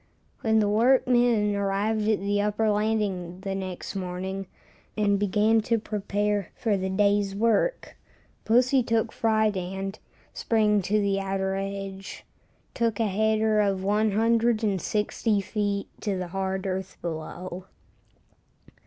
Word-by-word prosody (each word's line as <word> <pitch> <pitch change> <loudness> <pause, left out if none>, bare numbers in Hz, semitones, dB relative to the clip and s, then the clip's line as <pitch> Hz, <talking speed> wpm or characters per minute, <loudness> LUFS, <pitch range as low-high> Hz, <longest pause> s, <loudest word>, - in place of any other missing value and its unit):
When 220 -1 +2
the 210 -1 +3
workmen 240 -1 +3
arrived 205 +2 0
at 215 - +2
the 205 +1 0
upper 210 +1 +1
landing 205 -4 -1
the 195 -1 -3
next 190 0 -5
morning, 190 +1 -4 0.5
and 200 -2 +2
began 210 +3 +3
to 230 - +2
prepare 205 -2 -2
for 220 -4 0
the 190 -1 -2
day's 200 0 +2
work, 230 - +1 0.5
pussy 255 +4 +3
took 225 -1 0
fright 220 -2 +1
and, 190 +2 -4 0.3
springing 210 -2 +2
to 210 +3 +1
the 200 -1 +1
outer 195 0 -1
edge, 195 0 -6 0.5
took 230 -3 0
a 225 - +2
"header" 215 +1 +2
of 195 -2 0
160 215 0 +1
feet 200 0 -2
to 200 -3 -1
the 180 -1 -4
hard 190 +1 -2
earth 190 0 -4
below. 175 +2 -6
205 Hz, 125 wpm, -26 LUFS, 195-220 Hz, 0.5 s, the